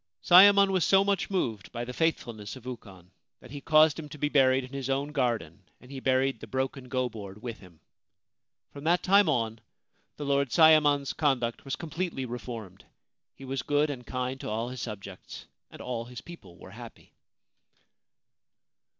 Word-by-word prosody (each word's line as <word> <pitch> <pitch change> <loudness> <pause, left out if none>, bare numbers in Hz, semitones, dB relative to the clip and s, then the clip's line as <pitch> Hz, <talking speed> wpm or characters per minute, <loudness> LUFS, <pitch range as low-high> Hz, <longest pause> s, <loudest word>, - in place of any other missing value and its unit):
Sayemon 200 +2 +7
was 185 -3 +1
so 195 0 +4
much 200 -2 -1
moved 115 - -2
by 120 0 -5
the 125 - -7
faithfulness 120 -10 -2
of 130 -2 -13
Ukon 95 -8 -10 0.3
that 125 - -15
he 145 0 -7
caused 155 0 +4
him 150 -2 -8
to 150 - -10
be 150 0 -1
buried 135 -2 +3
in 130 +2 -11
his 135 -1 -4
own 140 +2 -1
garden, 115 - -2 0.2
and 125 - -16
he 135 - -6
buried 130 -1 +1
the 115 - -10
broken 130 +2 -3
go 130 0 0
board 105 -3 -10
with 120 -3 -6
him. 90 -4 -17 0.9
From 140 - -10
that 175 +2 +2
time 200 -1 +5
on 115 -5 -1 0.6
the 145 - -5
Lord 140 -1 +1
Sayemon's 150 -2 +5
conduct 130 -6 -1
was 135 - -3
completely 165 -4 -4
reformed. 115 -6 -8 0.5
He 135 - -11
was 135 +1 -3
good 145 +1 +1
and 125 -3 -7
kind 125 +2 -4
to - - -6
all 115 +3 -2
his 130 -1 -7
subjects, 100 -4 -8 0.2
and - - -13
all 120 -2 -4
his 125 -1 -9
people 170 - -13
were - - -13
happy. - - -13
130 Hz, 175 wpm, -28 LUFS, 115-150 Hz, 0.9 s, Sayemon